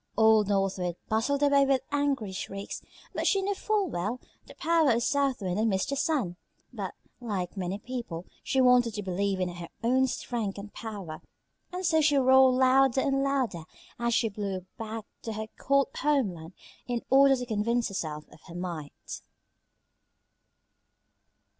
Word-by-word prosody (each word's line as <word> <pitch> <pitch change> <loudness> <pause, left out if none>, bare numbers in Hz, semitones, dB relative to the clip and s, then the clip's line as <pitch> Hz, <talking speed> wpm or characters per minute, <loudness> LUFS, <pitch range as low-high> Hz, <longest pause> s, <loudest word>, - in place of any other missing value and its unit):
Old 220 -2 +5
North 195 -1 +1
Wind 175 -2 -2
bustled 270 +7 +1
away 280 -1 +5
with 270 -2 +2
angry 280 -8 0
shrieks, 195 +1 -5 0.3
but - - -1
she 390 -1 +3
knew 405 +1 0
full 420 0 0
well 210 - -3 0.3
the - - -13
power 330 -3 +3
of 235 0 +2
South 275 -5 +1
Wind 185 +1 -1
and 220 0 +2
Mr. 190 +8 0
Sun, 265 - 0 0.4
but, - - -5 0.2
like 205 -7 -3
many 190 0 -3
people, 230 -8 -6 0.2
she 265 - 0
wanted 250 -3 +5
to 210 - -3
believe 195 +1 -1
in 185 - +1
her 175 -1 -8
own 260 +3 +3
strength 225 -6 -3
and 205 +1 -8
power; 200 -8 -7 0.5
and 365 +1 -4
so 320 -2 +4
she 295 -1 +4
roared 260 -1 +6
louder 265 0 +4
and 275 0 +1
louder 260 -11 0 0.4
as 235 -1 +1
she 230 - +2
blew 200 -3 -4
back 220 -1 -6 0.2
to 225 - -5
her 220 0 -4
cold 275 0 +2
homeland 195 - 0 0.3
in 240 -1 -2
order 270 0 +7
to 250 -1 -4
convince 230 +1 0
herself 155 -6 -4
of - - -17
her 170 - -10
might. 170 -5 -6
230 Hz, 160 wpm, -28 LUFS, 195-270 Hz, 0.5 s, order